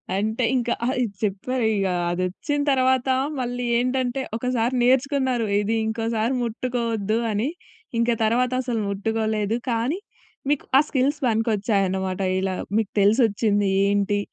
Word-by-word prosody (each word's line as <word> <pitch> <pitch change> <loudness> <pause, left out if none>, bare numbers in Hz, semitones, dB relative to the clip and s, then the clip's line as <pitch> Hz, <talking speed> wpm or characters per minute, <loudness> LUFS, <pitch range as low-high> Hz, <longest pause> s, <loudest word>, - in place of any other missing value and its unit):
అంటే, 220 +5 -1
ఇంకా 240 -1 +1
ఆహ్, 255 - 0
ఇది 200 -4 -4
చెప్పారిక 215 0 0 0.2
అదొచ్చిన 185 - -2
తర్వాత 260 0 +2 0.3
మళ్ళీ 245 0 -3
ఏంటంటే, 255 +1 0
ఒకసారి 245 0 0
నేర్చుకున్నారు 260 -2 +2
ఇది 215 +2 0
ఇంకోసారి 225 +2 -1
ముట్టుకోవద్దు 230 -2 -1
అని. 215 +7 0 0.5
ఇంక 235 +1 +2
తర్వాత 245 +3 +2
అసలు 245 -3 -2
ముట్టుకోలేదు 220 +1 -1
కానీ, 240 - 0 0.5
మీకు 290 - 0
ఆ - - +8
స్కిల్స్ 280 +2 +1
పనికొచ్చాయన్నమాట. 200 -4 0 0.2
ఇలా 190 0 -1 0.2
మీకు 220 -3 0
తెలిసొచ్చింది, 205 -2 +3 0.2
ఏంటి, 205 0 +1
230 Hz, 115 wpm, -23 LUFS, 205-250 Hz, 0.5 s, ఆ